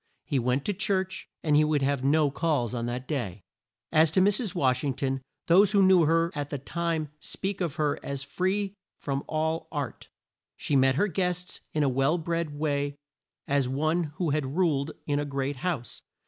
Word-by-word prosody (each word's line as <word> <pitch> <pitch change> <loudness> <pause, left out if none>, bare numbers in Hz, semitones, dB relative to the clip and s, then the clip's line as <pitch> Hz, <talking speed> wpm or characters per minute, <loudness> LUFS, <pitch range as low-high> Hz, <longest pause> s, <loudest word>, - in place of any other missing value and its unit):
He 140 - 0
went 125 +3 0
to 205 - 0
church 190 -1 -1
and 150 -2 +3
would 145 -3 +2
have 140 -1 0
no 145 +1 +3
calls 140 -7 0
on 120 -1 -2
that 125 +2 -4
day. 105 - -3 0.5
As 160 +1 +5
to 160 - +2
Mrs. 205 +1 +2
Wash 130 -6 +2
ing 140 -3 -1
ton, 135 0 -1 0.2
those 195 +4 +5
who 200 -1 +5
knew 185 -3 +6
her 165 +2 +2
at 145 -1 -4
the 145 - -3
time 165 +2 -2
speak 195 +4 -4
of 170 -5 -1
her 150 -2 0
as 140 -1 -4
free 190 +7 -1 0.2
from 140 -1 -3
all 160 +1 -1
art. 145 -5 -5 0.5
She 145 - -1
met 135 0 +4
her 205 +8 +2
guests 180 0 -2
in 150 - +1
a - - +3
well 135 +5 +2
bred 165 -2 -2
way 145 -1 -1 0.5
as 140 -2 +1
one 155 +5 +1
who 165 -2 0
had 145 0 -1
ruled 155 -6 +2 0.2
in 145 -1 0
a - - 0
great 140 -1 -2
house. 135 - -3
150 Hz, 190 wpm, -28 LUFS, 135-170 Hz, 0.5 s, knew